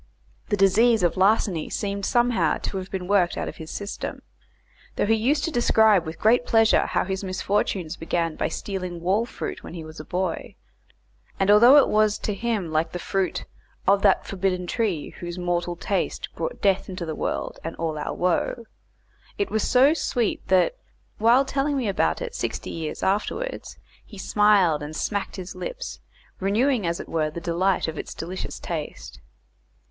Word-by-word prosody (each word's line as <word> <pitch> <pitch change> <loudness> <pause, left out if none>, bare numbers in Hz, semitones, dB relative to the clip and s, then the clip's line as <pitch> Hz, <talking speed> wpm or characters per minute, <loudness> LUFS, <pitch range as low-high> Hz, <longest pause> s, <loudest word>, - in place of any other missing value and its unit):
The 205 - +1
disease 215 +3 +4
of 170 -2 +2
larceny 190 -4 +2
seemed 200 -1 -2
somehow 240 -1 +2
to 195 - -4
have 190 0 -5
been 185 -2 -4
worked 190 -3 +2
out - - -2
of - - -7
his 160 -1 -8
system; 200 0 -5 0.7
though - - +1
he 220 - +3
used 265 +7 +1
to 330 - -1
describe 220 - +4
with 160 - -6
great 235 +3 +4
pleasure 225 -2 +4
how - - +1
his 190 +1 -3
misfortunes 185 -2 -1
began 165 -1 -1
by - - -1
stealing 185 -3 -5
wall 195 +7 +1
fruit - - -6
when - - -9
he 165 - -6
was 155 0 -10
a - - -6
boy; 180 +1 -3 0.8
and 195 +1 +4
although 240 +7 +8
it 285 - +6
was 215 -1 +3
to 210 - -3
him 210 -5 -2
like 155 +1 0
the - - -2
fruit 190 +1 -2 0.4
"Of 200 +1 +5
that 195 -2 +3
forbidden 185 -2 -1
tree, 180 -5 -1
whose 175 0 -6
mortal 175 -1 -1
taste - - -2
Brought - - -4
death 195 -1 +2
into 180 -2 -5
the 160 - -3
world, - - -3
and 165 - -5
all 160 -2 -2
our - - -3
woe." 180 +6 0 0.7
it 405 - -1
was 220 - +1
so 265 +8 +5
sweet 245 -8 -1
that, 190 - +3 0.4
while 240 +5 +5
telling 275 +1 0
me 250 -4 -1
about 200 - 0
it 485 -1 -6
sixty - - -4
years 160 -2 -5
afterwards, 215 - -2 0.3
he 210 - -13
smiled 195 -6 +3
and 150 +1 -6
smacked 200 +4 -2
his 185 -1 -7
lips, - - -6 0.4
renewing 215 +2 +1
as 170 0 -1
it - - -7
were 155 -2 0
the 155 - -6
delight 175 +3 0
of 160 -1 -4
its - - -7
delicious 180 +3 -5
taste. - - -6
195 Hz, 180 wpm, -24 LUFS, 175-225 Hz, 0.8 s, although